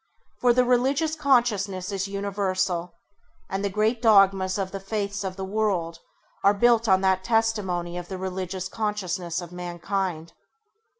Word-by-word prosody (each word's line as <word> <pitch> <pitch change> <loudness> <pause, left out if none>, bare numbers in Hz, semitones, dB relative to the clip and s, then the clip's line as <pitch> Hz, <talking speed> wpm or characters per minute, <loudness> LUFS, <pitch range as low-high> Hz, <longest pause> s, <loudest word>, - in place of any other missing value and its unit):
For 245 - +4
the 250 +1 +3
religious 270 +6 +2
consciousness 210 -10 +1
is 195 0 -2
universal 190 -3 -2 0.5
and 195 +1 -3
the 200 - 0
great 215 +4 0
dogmas 195 -4 +4
of 190 -1 -3
the 195 - -5
faiths 200 0 -3
of 190 -1 -4
the 190 0 -5
world 190 -5 -1 0.4
are 200 +1 +5
built 235 +1 +3
on 190 -1 +4
that 190 -1 +2
testimony 190 -6 0
of 175 - -9
the 190 - -5
religious 185 0 -4
consciousness 185 -5 -3
of 175 -1 -9
mankind. 175 -1 -4
195 Hz, 145 wpm, -25 LUFS, 185-215 Hz, 0.5 s, are